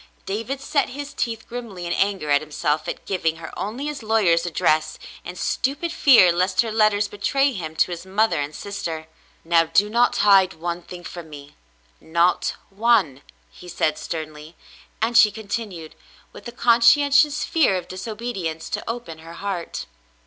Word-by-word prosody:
David 230 +7 -3
set 280 +1 0
his 285 +2 -7
teeth 225 -5 -3
grimly 230 -7 -7
in 170 - -2
anger 195 -7 0
at 145 - +4
himself 150 0 -2
at - - -6
giving 165 -4 -1
her 160 0 -10
only 235 +8 -4
his 295 -3 -4
lawyer's 195 -7 +2
address, 155 -2 +1 0.3
in 180 - -8
stupid 285 - -2
fear 245 - +6
lest 185 +2 +2
her 230 -2 -3
letters 215 -1 +2
betray 270 +7 0
him 160 -6 -6
to 180 - +2
his 170 -1 -6
mother 190 -4 +1
and 145 +1 -5
sister. 170 -6 -5 0.4
"Now, 165 0 +4
do 200 +6 +2
not 240 +2 +3
hide 195 -2 +5
one 170 +1 -4
thing 175 0 -11
from 170 -2 -9
me 145 -1 -12 0.3
— 60 0 -36 0.2
not 175 +1 +2 0.2
one," 195 - +2 0.3
he 180 - -14
said 155 -2 0
sternly, 155 0 -7 0.5
and 235 +1 0
she 215 - +8
continued, 200 -6 -6 0.4
with - - -11
a - - -6
conscientious 280 +6 +4
fear 305 - +2
of 180 -1 -6
disobedience, 190 -5 -5
to - - -2
open 230 -9 -6
her 165 +1 -11
heart. 180 -1 -5
195 Hz, 165 wpm, -22 LUFS, 165-230 Hz, 0.5 s, she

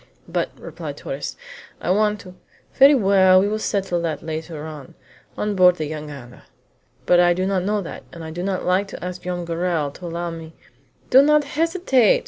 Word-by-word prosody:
"But," - - -1
replied - - -7
Torres, - - -5 0.4
"I - - -1
want 210 +1 +1
to 185 -2 -12 0.2
" - - -34
"Very 280 +2 +8
well, 190 -4 +5
we 195 - +2
will 215 +1 -1
settle 195 -5 -1
that 160 -3 -3
later 160 -1 -5
on, 150 -4 -10 0.4
on 210 0 -1
board 180 -2 +5
the 155 -3 -4
jangada." 145 -5 -8 0.6
"But 175 - +5
I 175 0 +4
do 185 +1 -1
not 190 -2 0
know 210 0 0
that, 165 - -9
and 170 -1 -9
I 160 - -7
do 175 +2 -5
not 190 0 -2
like 185 +3 +2
to 195 - -8
ask 180 0 -6
Joam 180 -1 -4
Garral 165 -3 -1
to 175 +5 -9
allow 170 +1 -4
me 165 -1 -9 0.3
" - - -36
"Do 265 - +8
not 300 +1 +4
hesitate!" 295 - +2
180 Hz, 200 wpm, -22 LUFS, 165-205 Hz, 0.6 s, Very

